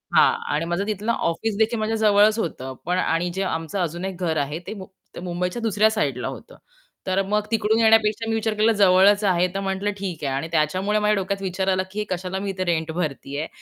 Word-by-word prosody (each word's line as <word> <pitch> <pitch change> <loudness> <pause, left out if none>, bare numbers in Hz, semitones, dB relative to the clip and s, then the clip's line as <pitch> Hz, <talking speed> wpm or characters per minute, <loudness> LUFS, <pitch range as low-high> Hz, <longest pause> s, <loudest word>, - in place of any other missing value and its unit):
हां. - - +6 0.2
आणि 155 - -1
माझं 175 +4 -1
तिथलं 215 +2 -1
ऑफिसदेखील 220 +4 0
माझ्या 215 +1 -1
जवळच 210 +1 +5
होतं, 130 -8 -4
पण 180 +1 0
आणि 170 0 0
जे 195 - -1
आमचं 165 +1 -3
अजून 175 +2 -4
1 190 -2 -5
घर 160 -2 0
आहे, 150 +4 -5
ते - - -4
मुं 190 -3 -9 0.3
ते - - -6
मुंबईच्या 180 +5 -3
दुसऱ्या 220 -1 +3
साईडला 140 - -1
होतं. - - -9 0.5
तर 190 +1 +2
मग 210 +2 +1
तिकडून 220 0 +2
येण्यापेक्षा 225 0 +3
मी 225 - +1
विचार 220 -1 0
केला, 215 +2 +3
जवळच 200 +2 +5
आहे, 180 -2 +3
तर 195 - -2
म्हटलं 195 +2 -1
ठीक 185 -6 -5
आहे. 135 - -1
आणि 140 +4 -2
त्याच्यामुळे 185 +7 +1
माझ्या 210 0 +2
डोक्यात 195 0 -2
विचार 190 0 -2
आला, 185 0 +1
की 210 - -5
हे 210 - -1
कशाला 185 +1 -3
मी 200 0 -3
इथे 185 -1 -2
रेंट 160 -1 0
भरते 150 -4 -4
आहे. 155 - -3
190 Hz, 220 wpm, -23 LUFS, 175-210 Hz, 0.5 s, हां